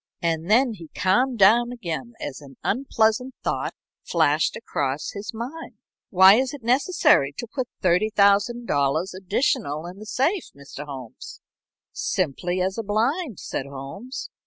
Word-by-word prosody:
And 165 +1 -1
then 240 +2 +4
he 170 -6 -11
calmed 235 +8 +2
down 230 +5 +5
again 235 0 -5
as 140 +1 -6
an 135 -2 -14
unpleasant 245 +1 +1
thought - - -2 0.3
flashed 155 -2 +2
across 140 -10 -3
his 205 +1 -6
mind. 255 +9 -7 0.3
"Why 190 +2 +7
is 260 +2 0
it 270 - -13
necessary 250 - +3
to - - -4
put 250 +2 -4 0.2
$30,000 200 - +2
additional 190 - -1
in 180 +3 -9
the 215 - -10
safe, 320 - 0
Mr. 140 +1 -9
Holmes?" 130 -5 -9 0.5
"Simply 175 +2 -1
as 190 +4 -1
a - - -2
blind," 235 - -1
said 135 - -4
Holmes. 140 - -7
200 Hz, 135 wpm, -24 LUFS, 160-240 Hz, 0.5 s, Why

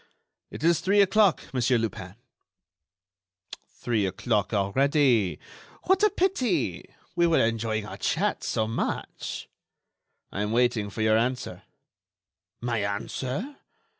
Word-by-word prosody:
"It - - -8
is 170 0 +4
three 200 +2 +2
o'clock, 200 -2 +4
Monsieur 125 -1 +2
Lupin." 100 -4 -4 1.5
"Three 110 -5 -1
o'clock, 105 +2 -1
already? 120 - +2 0.5
What 380 +1 +3
a 425 - +5
pity! 250 - 0 0.3
We 170 0 +3
were 165 - +3
enjoying 110 -1 -1
our - - -8
chat - - -1
so 110 - 0
much." 115 +1 -4 0.8
"I 100 - -3
am 105 +1 -1
waiting 120 -4 +1
for 110 +2 -3
your 110 0 +4
answer." 125 +2 -2 1.0
"My 120 -2 -1
answer? 130 - -3
120 Hz, 115 wpm, -26 LUFS, 105-165 Hz, 1.5 s, a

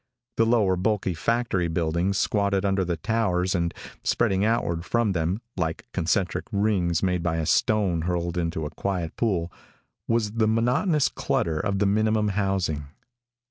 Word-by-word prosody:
The 115 - +4
lower, 110 -5 +3
bulky 95 0 0
factory 105 -1 0
buildings 85 +3 0
squatted 100 -2 +1
under 95 -1 +1
the 85 -2 -2
towers 95 -2 0
and 85 -2 0 0.3
spreading 100 -4 +1
outward 105 -7 0
from 115 +1 +1
them, 90 +4 -1
like 80 -3 -2
concentric 90 +2 0
rings 100 -5 +1
made 90 -2 +1
by 85 -1 0
a 80 - -1
stone 95 -3 +2
hurled 85 0 -2
into 85 -2 -2
a 75 - -5
quiet 90 -1 -3
pool, 90 -7 0 0.6
was 115 -2 +1
the 110 0 +1
monotonous 125 - +2
clutter 80 -2 -1
of 100 +3 -1
the 100 - +2
minimum 110 +1 +2
housing. 95 -7 -1
95 Hz, 150 wpm, -25 LUFS, 85-110 Hz, 0.6 s, The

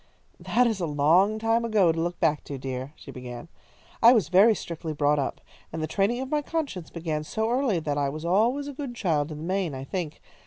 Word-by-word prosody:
"That 250 - +2
is 225 -4 0
a 170 - -1
long 165 +9 +3
time 225 +1 +1
ago 210 -7 +3
to 165 - -3
look 175 +1 -3
back 155 -3 +1
to, 140 - -6
dear," 130 +1 -5
she 140 - -11
began. 125 +3 -8 0.5
"I 235 +2 +9
was 225 -5 +2
very 205 +5 +6
strictly 165 -3 -5
brought 145 0 +2
up, 135 - -3 0.3
and 160 - -5
the - - -1
training 210 +8 0
of 265 - -6
my 300 -1 +2
conscience 285 - -4
began 160 -2 -3
so 220 +8 -2
early 245 -8 +1
that 145 -2 -1
I 140 -1 +1
was 155 +3 -6
always 235 +11 +2
a 285 - -6
good 270 -3 -6
child 155 -8 0
in 150 - -6
the 155 - -7
main, 180 -4 -1
I 130 - -6
think. 160 +1 -4
175 Hz, 230 wpm, -26 LUFS, 150-225 Hz, 0.5 s, I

